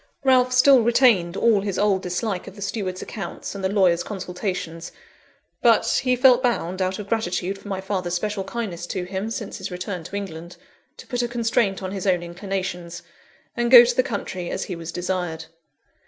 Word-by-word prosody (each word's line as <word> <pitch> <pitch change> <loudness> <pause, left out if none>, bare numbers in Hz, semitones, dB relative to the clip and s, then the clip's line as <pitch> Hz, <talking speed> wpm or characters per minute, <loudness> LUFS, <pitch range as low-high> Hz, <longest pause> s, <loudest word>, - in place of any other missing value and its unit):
Ralph 255 -1 +4
still 255 0 +6
retained 225 -7 +3
all 225 -4 +3
his 200 -2 -3
old 200 -2 +2
dislike 180 +1 -3
of - - -10
the 205 - -11
steward's 190 -3 -3
accounts 195 -6 -6
and 200 -1 -7
the 190 - +1
lawyer's 185 -4 +3
consultations; 180 -4 -5 0.7
but - - +3
he 255 -1 +2
felt 250 0 +5
bound, 190 -7 -1
out 185 0 0
of 210 - -7
gratitude 195 -3 -2
for 200 - -13
my 195 -2 -3
father's 185 -3 -2
special 205 +1 -2
kindness 190 -4 -5
to 185 0 -3
him 190 +4 -4
since 220 -2 -5
his - - -5
return 180 -1 -5
to 200 - -7
England, 175 -3 -6 0.4
to - - -11
put 245 -2 -2
a 240 - 0
constraint 230 -4 0
on 185 - -4
his 195 0 -4
own 180 -2 +2
inclinations, 175 -1 -5 0.5
and 240 0 0
go 240 -1 +10
to 240 0 0
the 255 - +4
country 200 -8 -4
as - - -3
he 180 - -5
was 165 0 -7
desired. 175 -2 -3
195 Hz, 190 wpm, -23 LUFS, 180-230 Hz, 0.7 s, go